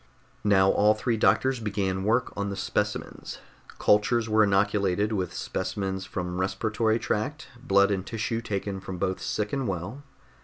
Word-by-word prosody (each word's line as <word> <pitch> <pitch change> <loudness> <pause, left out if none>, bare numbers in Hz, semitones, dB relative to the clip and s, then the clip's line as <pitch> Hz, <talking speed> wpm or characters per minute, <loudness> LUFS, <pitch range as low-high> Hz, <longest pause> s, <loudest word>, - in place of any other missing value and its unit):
Now 95 -2 +5
all 105 +1 +4
three 115 +2 0
doctors 130 +3 +2
began 100 -3 -1
work 115 +5 +1
on 100 0 -2
the 100 - -4
specimens. - - -3 0.4
Cultures 110 +2 +3
were 110 0 +4
inoculated 100 0 +2
with 95 -5 -1
specimens 95 -1 -3
from 90 -1 -3
respiratory 110 +4 0
tract, 135 +8 -3
blood 100 -4 +4
and 95 -2 -1
tissue 115 +2 -3
taken 100 -3 -3
from 95 -1 -7
both 95 +1 -2
sick 105 -1 -2
and 135 -3 -1
well. 95 +8 -4
105 Hz, 150 wpm, -27 LUFS, 95-110 Hz, 0.4 s, Now